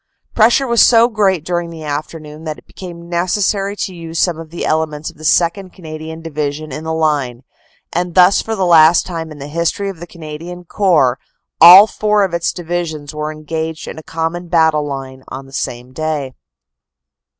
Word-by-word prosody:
Pressure 235 +5 +4
was 235 -2 +3
so 230 -1 +6
great 195 -8 0
during 175 -1 -2
the 165 -1 -9
afternoon 150 +1 -6
that 155 -2 -5
it - - -18
became 170 -2 -10
necessary 195 +3 0
to 190 - -4
use 165 -1 -8
some 170 -2 +1
of 165 -1 -9
the 170 - -5
elements 155 -1 -1
of - - -25
the 155 - -14
2nd. 180 +4 +1
Canadian 160 -1 -9
Division 150 -1 -4
in 155 - -6
the 160 - -2
line, 145 -6 -1 0.5
and 175 0 -2
thus 185 +1 +5
for 225 - -4
the 190 -3 0
last 165 -1 +6
time 165 -3 -6
in 150 - -10
the 140 - -8
history 170 +6 -2
of 190 -4 -8
the 175 - -9
Canadian 170 +2 -9
Corps 165 -9 +2 0.4
all 180 +5 +11
four 210 -1 +1
of 190 -3 -2
its 170 0 0
Divisions 165 -4 -4
were 150 0 -4
engaged 160 +1 -5
in - - -7
a - - -9
common 165 +2 -4
battle 160 -3 +2
line 135 -2 -7
on 135 +1 -8
the 135 - -17
same 125 -1 -5
day. 150 -3 -3
165 Hz, 185 wpm, -16 LUFS, 155-180 Hz, 0.5 s, all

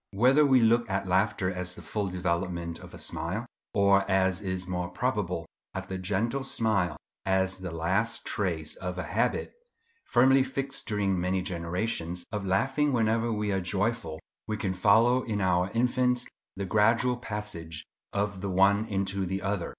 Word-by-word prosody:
Whether 130 +8 +5
we 130 -2 +6
look 115 0 +3
at 100 0 -1
laughter 95 0 +1
as 90 0 -4
the - - -11
full 105 -2 -2
development 85 -2 -2
of - - -11
a - - -9
smile, - - -3 0.3
or, 100 0 +5
as 95 -1 +2
is 95 -2 -3
more 90 -1 -2
probable, 90 -5 -1 0.3
at - - -5
a 95 - -3
gentle 110 +8 -1
smile 110 -8 0 0.3
as 95 0 +1
the 95 -1 -5
last 95 +8 0
trace 85 -6 -2
of 90 -1 -5
a 90 - -2
habit, - - -1 0.5
firmly 130 +2 +5
fixed 135 +1 -3
during 100 -3 0
many 90 +1 0
generations, 90 0 -3
of 105 -3 -3
laughing 135 +10 +2
whenever 115 0 +2
we 105 -1 -1
are 95 -1 0
joyful, 95 -4 -1 0.3
we 110 -1 -2
can 95 -3 -1
follow 115 +7 +4
in 110 -4 -2
our 90 -1 +2
infants 125 +1 +2 0.3
the 100 0 -3
gradual 115 +5 +3
passage 105 -9 -5 0.3
of 100 -1 -2
the 100 - -2
one 100 +3 +4
into 100 -2 -1
the 95 +2 -3
other. 100 -3 -1
100 Hz, 165 wpm, -28 LUFS, 90-115 Hz, 0.5 s, we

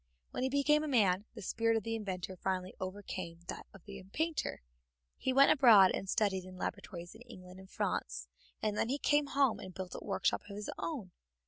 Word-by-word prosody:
When - - -3
he 260 - +1
became 300 +2 +3
a - - -2
man, 205 -7 +3
the 215 - -8
spirit 225 +3 +1
of 220 - -2
the 225 - -2
inventor 190 -4 -4
finally 185 0 -2
overcame 185 -3 -5
that - - -6
of 195 - -15
the 200 -2 -9
painter. 320 - -1 0.5
He 260 - -1
went 275 +2 +7
abroad 225 -9 +8
and 195 - -3
studied 190 -3 +1
in 185 0 -11
laboratories 175 -3 -5
in - - -15
England 185 -6 -12
and 190 0 -13
France, 65 +1 -2 0.4
and 210 -1 +1
then 225 - 0
he 275 - +1
came 290 0 +2
home 275 -4 +2
and 185 -2 -9
built 185 -1 -6
a - - -7
workshop - - 0
of 200 - -7
his 210 0 -4
own. 250 - -4
205 Hz, 205 wpm, -33 LUFS, 185-255 Hz, 0.5 s, abroad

